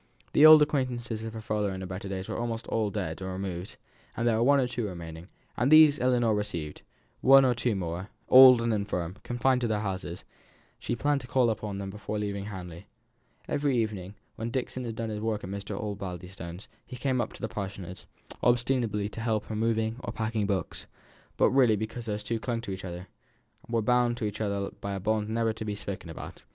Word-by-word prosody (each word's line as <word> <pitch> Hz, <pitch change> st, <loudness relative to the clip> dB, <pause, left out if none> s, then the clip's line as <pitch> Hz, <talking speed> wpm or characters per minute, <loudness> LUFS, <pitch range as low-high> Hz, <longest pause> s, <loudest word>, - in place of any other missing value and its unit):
The 155 Hz, -, +8 dB
old 155 Hz, -1 st, +10 dB
acquaintances 120 Hz, -6 st, -2 dB
of 115 Hz, 0 st, -5 dB
her 110 Hz, -, -6 dB
father 105 Hz, -2 st, -1 dB
in 95 Hz, 0 st, -5 dB
his 95 Hz, -, -5 dB
better 95 Hz, +2 st, -6 dB
days 95 Hz, -1 st, -4 dB
were -, -, -4 dB
almost 115 Hz, -1 st, -3 dB
all 110 Hz, -2 st, 0 dB
dead 95 Hz, -5 st, -4 dB
or 95 Hz, 0 st, -4 dB
removed; 95 Hz, -1 st, -5 dB, 0.4 s
there 115 Hz, -1 st, +2 dB
were -, -, +1 dB
one 140 Hz, +3 st, +5 dB
or 130 Hz, -, +2 dB
two 120 Hz, -3 st, -3 dB
remaining, 85 Hz, -2 st, -8 dB, 0.3 s
and 125 Hz, +5 st, +1 dB
these 155 Hz, -1 st, +8 dB
Ellinor 120 Hz, -3 st, +2 dB
received; 85 Hz, -8 st, -3 dB, 0.4 s
one 135 Hz, 0 st, +7 dB
or 125 Hz, -, +3 dB
two 120 Hz, -1 st, 0 dB
more, 90 Hz, +1 st, -4 dB, 0.2 s
old 130 Hz, -2 st, +9 dB
and 115 Hz, -1 st, +1 dB
infirm, 100 Hz, -3 st, -2 dB
confined 125 Hz, +1 st, +1 dB
to 120 Hz, -, +1 dB
their 105 Hz, -2 st, 0 dB
houses, 95 Hz, -3 st, -4 dB, 0.5 s
she 120 Hz, -, -2 dB
planned 145 Hz, +3 st, +1 dB
to 120 Hz, -, -10 dB
call 125 Hz, -1 st, +3 dB
upon 100 Hz, -2 st, -4 dB
before 105 Hz, +1 st, -5 dB
leaving 100 Hz, -1 st, -3 dB
Hamley. 90 Hz, -2 st, -8 dB, 0.6 s
Every 140 Hz, -3 st, +1 dB
evening, 105 Hz, -4 st, -2 dB, 0.2 s
when 115 Hz, +1 st, -3 dB
Dixon 130 Hz, 0 st, -3 dB
had 115 Hz, -2 st, -4 dB
done 115 Hz, -1 st, -3 dB
his 105 Hz, -, -4 dB
work 110 Hz, -1 st, -2 dB
at 95 Hz, -, -6 dB
Mr. 100 Hz, 0 st, -5 dB
Osbaldistone's, 90 Hz, -3 st, -6 dB, 0.2 s
he 130 Hz, -, -9 dB
came 130 Hz, 0 st, 0 dB
up 110 Hz, -, -3 dB
to -, -, -12 dB
the -, -, 0 dB
Parsonage, 95 Hz, -4 st, -7 dB, 0.3 s
ostensibly 120 Hz, -4 st, +1 dB
to 110 Hz, +2 st, -7 dB
help 110 Hz, -2 st, 0 dB
her -, -, -6 dB
in 105 Hz, -, -2 dB
moving 110 Hz, 0 st, 0 dB
or -, -, -4 dB
packing 110 Hz, -2 st, -1 dB
books, 100 Hz, -2 st, -3 dB, 0.5 s
but -, -, +4 dB
really 125 Hz, -5 st, +5 dB
because 110 Hz, +3 st, -5 dB
these 105 Hz, -1 st, -3 dB
two 115 Hz, +2 st, -2 dB
clung 120 Hz, 0 st, -2 dB
to 110 Hz, -, -6 dB
each 95 Hz, 0 st, -6 dB
other 90 Hz, 0 st, -6 dB, 0.6 s
were 115 Hz, -1 st, +1 dB
bound 120 Hz, 0 st, +2 dB
to 110 Hz, -, -2 dB
each 105 Hz, +1 st, -4 dB
other 100 Hz, -2 st, -1 dB
by 100 Hz, 0 st, -6 dB
a 100 Hz, -, -3 dB
bond 105 Hz, +2 st, 0 dB
never 115 Hz, 0 st, 0 dB
to 110 Hz, -, -6 dB
be 105 Hz, -1 st, -3 dB
spoken 95 Hz, -4 st, -6 dB
about. 80 Hz, -, -9 dB
110 Hz, 210 wpm, -28 LUFS, 100-120 Hz, 0.6 s, old